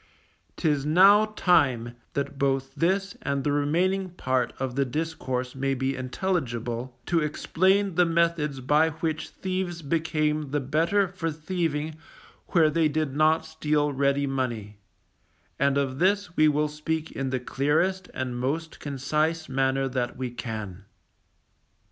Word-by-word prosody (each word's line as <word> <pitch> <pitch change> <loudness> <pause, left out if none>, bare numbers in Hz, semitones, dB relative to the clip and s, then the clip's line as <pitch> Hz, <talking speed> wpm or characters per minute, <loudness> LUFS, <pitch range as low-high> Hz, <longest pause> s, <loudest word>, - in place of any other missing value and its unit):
'Tis 150 -5 +1
now 195 +8 +6
time, 130 - +3 0.2
that 140 0 -3
both 135 -1 0
this 190 +3 0
and 140 -1 -1
the 145 - +1
remaining 180 +7 +1
part 130 -8 -1
of 130 -2 -3
the 140 - +2
discourse 130 -3 -3
may 135 0 -1
be 135 +1 -1
intelligible, 125 - -3
to 170 -1 +2
explain 185 +6 +1
the 180 +2 +4
methods 165 -5 +1
by 150 +5 +3
which 160 0 -3
thieves 185 -3 -4
became 155 -1 0
the 145 +2 0
better 165 +9 +1
for 180 -2 -3
thieving 155 -1 -2 0.5
where 160 -3 +4
they 160 0 +3
did 150 -2 -1
not 155 +1 +3
steal 150 -2 0
ready 140 +1 +1
money; 120 -7 -3 0.8
and 140 0 +2
of 135 -1 -1
this 190 0 +1
we 155 - +5
will 150 0 +2
speak 155 +1 -3
in 135 -1 -3
the 130 0 -1
clearest 160 +9 0
and 125 -2 -4
most 155 +6 -3
concise 150 +4 -1
manner 135 0 +1
that 125 -2 -2
we 130 -1 -3
can. 105 -5 -6
150 Hz, 140 wpm, -26 LUFS, 135-165 Hz, 0.8 s, now